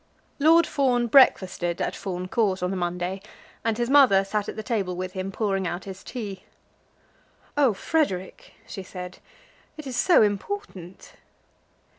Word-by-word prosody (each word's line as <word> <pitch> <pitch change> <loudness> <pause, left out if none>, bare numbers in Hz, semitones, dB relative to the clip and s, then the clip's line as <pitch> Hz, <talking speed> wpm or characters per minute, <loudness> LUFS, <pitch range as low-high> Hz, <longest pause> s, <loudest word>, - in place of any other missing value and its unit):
Lord 325 +3 +5
Fawn 255 -5 +1
breakfasted 185 -8 +3
at - - -2
Fawn 185 -2 -5
Court 190 -3 0
on 180 - 0
the - - -2
Monday, 180 +1 -3 0.4
and 225 -1 0
his 240 0 0
mother 255 -8 +6
sat 205 +1 -2
at - - -6
the 220 - -6
table 200 -6 -2
with 185 +1 -4
him, 190 0 -5
pouring 195 -2 -1
out 175 +2 -4
his 190 -1 -9
tea. 205 -7 -7 1.1
"Oh, 275 -7 +3
Frederic," 195 - -2
she 195 - -7
said, 180 -1 -9 0.6
"it 305 - -8
is 260 -2 -5
so 345 +2 +5
important!" 205 - -4
195 Hz, 150 wpm, -25 LUFS, 185-245 Hz, 1.1 s, mother